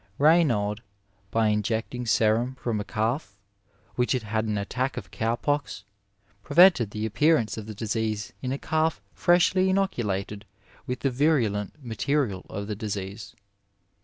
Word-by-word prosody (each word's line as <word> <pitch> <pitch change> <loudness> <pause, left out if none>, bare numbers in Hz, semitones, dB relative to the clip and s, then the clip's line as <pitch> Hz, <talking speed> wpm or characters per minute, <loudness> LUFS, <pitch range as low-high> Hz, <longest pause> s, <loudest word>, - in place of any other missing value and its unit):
Raynaud, 130 -10 +3 0.5
by 110 0 +2
injecting 110 +3 -1
serum 115 +4 +2
from 120 -4 -2
a - - -2
calf 110 +1 -2 0.6
which 125 +2 +1
had 125 -3 -1
had 110 +1 -1
an 105 -1 -1
attack 125 +7 -2
of - - -7
cow 115 +1 0
pox, 145 -5 -2 0.6
prevented 170 - +5
the 105 +1 -4
appearance 115 +3 +2
of 110 -1 -7
the 110 - -7
disease 110 -1 -2
in 130 - -3
a 135 - -1
calf 155 -2 0
freshly 185 +1 +3
inoculated 105 - -1 0.4
with 125 0 -3
the 135 - +1
virulent 120 -8 +1
material 115 -3 -1
of 100 +1 -5
the 105 0 -4
disease. 100 -1 -6
115 Hz, 140 wpm, -26 LUFS, 105-140 Hz, 0.6 s, prevented